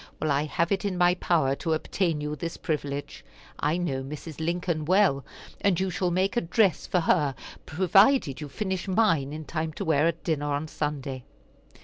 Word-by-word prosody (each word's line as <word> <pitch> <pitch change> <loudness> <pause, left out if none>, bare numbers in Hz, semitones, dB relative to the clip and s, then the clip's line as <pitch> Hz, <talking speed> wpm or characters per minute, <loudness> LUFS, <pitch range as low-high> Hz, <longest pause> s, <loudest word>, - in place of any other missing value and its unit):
Well, 155 - 0
I 140 +2 +1
have 170 +4 -1
it 195 0 +1
in 195 -3 -2
my 175 0 +5
power 165 -6 +1
to 165 -2 -1
obtain 160 0 -1
you 150 0 -3
this 165 +3 -5
privilege. 145 -3 -4 0.4
I 150 +3 +1
know 165 -7 -2
Mrs. 150 +3 -8
Lincoln 170 -1 -1
well, 180 -5 +3 0.4
and 195 -4 +2
you 190 0 0
shall 180 +1 0
make 185 +4 0
a 240 - +2
dress 190 +1 +1
for 180 - +1
her 145 -5 +2 0.3
provided 190 - +3
you 150 - -6
finish 190 +3 -3
mine 185 -9 +2
in 155 +1 -6
time 160 0 -3
to 200 - -5
wear 160 -1 +3
at 170 0 -2
dinner 145 -3 -1
on 145 +2 -2
Sunday." 140 -4 -4
165 Hz, 190 wpm, -27 LUFS, 150-185 Hz, 0.4 s, my